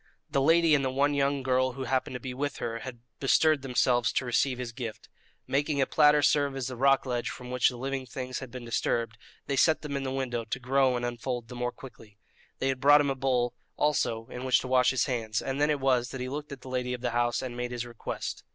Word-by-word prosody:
The 140 Hz, -, +2 dB
lady 165 Hz, +2 st, +4 dB
and 140 Hz, -2 st, +3 dB
the 130 Hz, -, +1 dB
one 140 Hz, +3 st, +1 dB
young 140 Hz, -1 st, +1 dB
girl 130 Hz, 0 st, +1 dB
who 135 Hz, +1 st, -5 dB
happened 130 Hz, 0 st, -1 dB
to -, -, -4 dB
be 125 Hz, +1 st, -6 dB
with 145 Hz, +2 st, -3 dB
her 115 Hz, 0 st, -3 dB
had 120 Hz, -1 st, -8 dB, 0.2 s
bestirred 140 Hz, +3 st, +3 dB
themselves 125 Hz, -2 st, +2 dB
to 130 Hz, -, 0 dB
receive 125 Hz, +1 st, +1 dB
his 125 Hz, -2 st, -5 dB
gift. 115 Hz, -3 st, -7 dB, 0.4 s
Making 145 Hz, +1 st, 0 dB
a 135 Hz, -, +4 dB
platter 150 Hz, +1 st, +4 dB
serve 145 Hz, -2 st, +2 dB
as 135 Hz, -2 st, -3 dB
the 130 Hz, -, -4 dB
rock 135 Hz, +2 st, +3 dB
ledge 120 Hz, -2 st, -2 dB
from 125 Hz, 0 st, -8 dB
which 125 Hz, -1 st, +3 dB
the 125 Hz, -, -8 dB
living 135 Hz, +1 st, -3 dB
things 130 Hz, +1 st, -5 dB
had 130 Hz, -, -8 dB
been 125 Hz, 0 st, -8 dB
disturbed, 115 Hz, -1 st, -1 dB, 0.3 s
they 140 Hz, -, -1 dB
set 155 Hz, +4 st, +3 dB
them 145 Hz, -2 st, -4 dB
in 140 Hz, -, -1 dB
the 135 Hz, -1 st, -3 dB
window 125 Hz, -3 st, -2 dB
to 110 Hz, +3 st, -4 dB
grow 130 Hz, 0 st, +2 dB
and 120 Hz, -, -2 dB
unfold 120 Hz, 0 st, -4 dB
the 125 Hz, -, -8 dB
more 125 Hz, 0 st, -2 dB
quickly. 115 Hz, -7 st, -14 dB, 0.4 s
They 135 Hz, -, 0 dB
had 130 Hz, -1 st, -2 dB
brought 145 Hz, +1 st, +7 dB
him 140 Hz, -1 st, 0 dB
a -, -, -2 dB
bowl 125 Hz, -2 st, 0 dB, 0.2 s
also 120 Hz, -6 st, +1 dB
in 125 Hz, -, -7 dB
which 130 Hz, -1 st, +4 dB
to -, -, -6 dB
wash 125 Hz, -1 st, +4 dB
his 130 Hz, -3 st, +1 dB
hands, 115 Hz, -4 st, -1 dB
and 135 Hz, +1 st, -3 dB
then 150 Hz, -, +3 dB
it 150 Hz, -1 st, +1 dB
was 130 Hz, -2 st, +2 dB
that 135 Hz, -, -6 dB
he 125 Hz, 0 st, -3 dB
looked 145 Hz, +2 st, -6 dB
at 135 Hz, -2 st, -8 dB
the -, -, -12 dB
lady 125 Hz, -1 st, -2 dB
of 120 Hz, -, -11 dB
the 125 Hz, -1 st, -1 dB
house 120 Hz, +1 st, 0 dB
and 125 Hz, -2 st, -5 dB
made 125 Hz, 0 st, -3 dB
his 120 Hz, -1 st, -4 dB
request. 120 Hz, -2 st, -6 dB
130 Hz, 255 wpm, -28 LUFS, 120-135 Hz, 0.4 s, brought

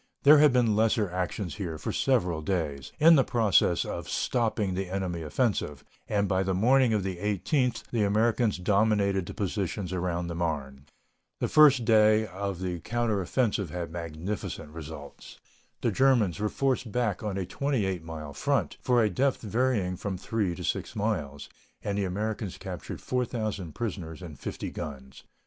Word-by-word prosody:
There 145 Hz, +1 st, +8 dB
had 150 Hz, -1 st, +6 dB
been 120 Hz, -4 st, +3 dB
lesser 110 Hz, -3 st, +2 dB
actions 90 Hz, -1 st, -3 dB
here 85 Hz, -6 st, -4 dB
for -, -, -4 dB
several 90 Hz, -12 st, +1 dB
days, 75 Hz, -6 st, -2 dB
in 160 Hz, +2 st, +7 dB
the 135 Hz, -, +5 dB
process 105 Hz, -8 st, +2 dB
of -, -, -5 dB
stopping 110 Hz, -5 st, 0 dB
the 95 Hz, 0 st, -3 dB
enemy 90 Hz, -3 st, -2 dB
offensive, 80 Hz, -, -1 dB, 0.3 s
and 100 Hz, -1 st, +1 dB
by 95 Hz, -1 st, +1 dB
the 95 Hz, -1 st, 0 dB
morning 125 Hz, +5 st, +4 dB
of 105 Hz, -3 st, +1 dB
the 95 Hz, -2 st, -3 dB
18th 105 Hz, -, 0 dB
the 115 Hz, -, 0 dB
Americans 110 Hz, +2 st, +2 dB
dominated 100 Hz, -1 st, +2 dB
the -, -, -7 dB
positions 95 Hz, -1 st, -2 dB
around 90 Hz, -1 st, -1 dB
the 85 Hz, -, -4 dB
Marne. 70 Hz, -5 st, -3 dB, 0.5 s
The -, -, 0 dB
first 140 Hz, -6 st, +6 dB
day 110 Hz, -1 st, +5 dB
of 100 Hz, -2 st, -4 dB
the 90 Hz, -2 st, -3 dB
counter 110 Hz, +1 st, -1 dB
offensive 100 Hz, -, 0 dB
had 85 Hz, 0 st, -5 dB
magnificent 85 Hz, 0 st, -5 dB
results. 80 Hz, -3 st, -10 dB, 0.4 s
The -, -, +1 dB
Germans 120 Hz, -9 st, +3 dB
were 105 Hz, 0 st, 0 dB
forced 130 Hz, -3 st, -1 dB
back 115 Hz, -4 st, 0 dB
on 105 Hz, -3 st, -3 dB
a 95 Hz, -, -2 dB
28 100 Hz, -, -1 dB
mile 80 Hz, -3 st, -7 dB
front, -, -, 0 dB
for 120 Hz, -2 st, +3 dB
a -, -, +4 dB
depth 135 Hz, +8 st, +1 dB
varying 110 Hz, -5 st, 0 dB
from 95 Hz, 0 st, -4 dB
3 100 Hz, -2 st, -1 dB
to -, -, -7 dB
6 -, -, -2 dB
miles, 80 Hz, -10 st, -2 dB, 0.4 s
and 100 Hz, -, -2 dB
the 100 Hz, -1 st, 0 dB
Americans 105 Hz, +1 st, -3 dB
captured -, -, -7 dB
4,000 110 Hz, -9 st, -2 dB
prisoners 90 Hz, -7 st, -5 dB
and 75 Hz, -6 st, -9 dB
50 -, -, -5 dB
guns. 65 Hz, -3 st, -8 dB
100 Hz, 165 wpm, -28 LUFS, 85-115 Hz, 0.5 s, There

